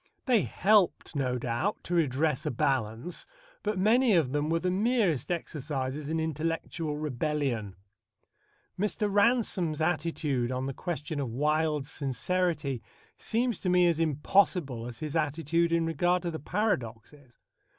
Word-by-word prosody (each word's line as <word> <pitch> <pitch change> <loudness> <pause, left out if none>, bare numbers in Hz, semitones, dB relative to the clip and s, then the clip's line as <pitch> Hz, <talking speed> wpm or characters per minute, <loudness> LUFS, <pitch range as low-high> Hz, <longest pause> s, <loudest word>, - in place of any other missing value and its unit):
They 245 -5 +4
helped, 185 - +2
no 130 -3 0
doubt, 120 - -2
to 175 - -4
redress 150 -3 +1
a - - +2
balance, 130 +2 -1 0.3
but 210 -1 -1
many 225 +3 +4
of 155 -7 +2
them 150 +1 0
were 165 - +2
the 180 +2 0
merest 200 - +1
exercises 145 -4 -3
in 160 0 0
intellectual 160 0 -2
rebellion. 140 -7 -2 1.0
Mr. 210 +1 0
Ransome's 205 -7 +2
attitude 155 -6 0
on 130 +1 -2
the 135 - -3
question 155 -1 -4
of 135 -4 -2
Wilde's 150 +3 0
sincerity 145 -1 -1 0.4
seems 235 -1 0
to 185 - -1
me 180 0 +5
as 170 -2 +2
impossible 150 - +1
as 120 - -7
his 155 -1 -5
attitude 165 +2 +1
in 170 -1 +2
regard 175 +3 +1
to 170 - -2
the 160 - -5
paradoxes. 135 - -3
155 Hz, 140 wpm, -29 LUFS, 135-180 Hz, 1.0 s, me